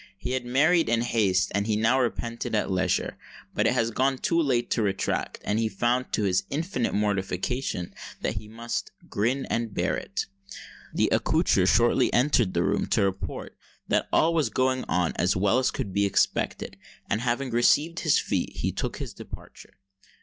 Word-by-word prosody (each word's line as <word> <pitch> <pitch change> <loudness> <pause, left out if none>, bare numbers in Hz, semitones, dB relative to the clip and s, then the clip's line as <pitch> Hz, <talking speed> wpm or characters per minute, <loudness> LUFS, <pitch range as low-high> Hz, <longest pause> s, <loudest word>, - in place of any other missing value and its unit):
He 125 - -5
had 130 -1 -2
married 160 +6 +3
in 115 0 +2
haste, 100 -6 +1
and 100 +1 0
he 110 - +1
now 115 +5 +3
repented 115 -2 -2
at 105 - 0
leisure. 90 -1 0 0.3
But - - +2
it - - +2
was 130 +4 +1
too 170 0 +2
late 125 -5 0
to 115 - +1
retract; 100 -2 -1
and 105 +2 0
he 115 -1 +1
found, 120 +5 0
to 105 - +1
his 95 -1 +2
infinite 145 -4 -2
mortification, 100 0 -1 0.3
that - - -2
he 105 +1 -7
must 115 +2 -4 0.2
"grin 125 +6 0
and 115 -3 -2
bear - - +1
it." - - -4 0.7
The - - +1
accoucheur - - +2
shortly - - +3
entered 120 -7 +2
the 85 - +2
room 100 +2 0
to 110 - +2
report 95 -5 -3 0.3
that - - +1
"all 165 +2 +3
was 155 -7 +1
going 130 +3 0
on 90 -2 0
as 90 +2 +2
well 100 +6 +3
as 130 - +2
could 95 - -4
be 100 +1 +2
expected;" 100 - 0 0.3
and, 105 - 0
having 125 +2 -1
received 150 +8 +3
his 155 -4 +3
fee, - - -1
he - - -1
took - - -4
his - - -6
departure. - - -12
115 Hz, 180 wpm, -26 LUFS, 100-130 Hz, 0.7 s, married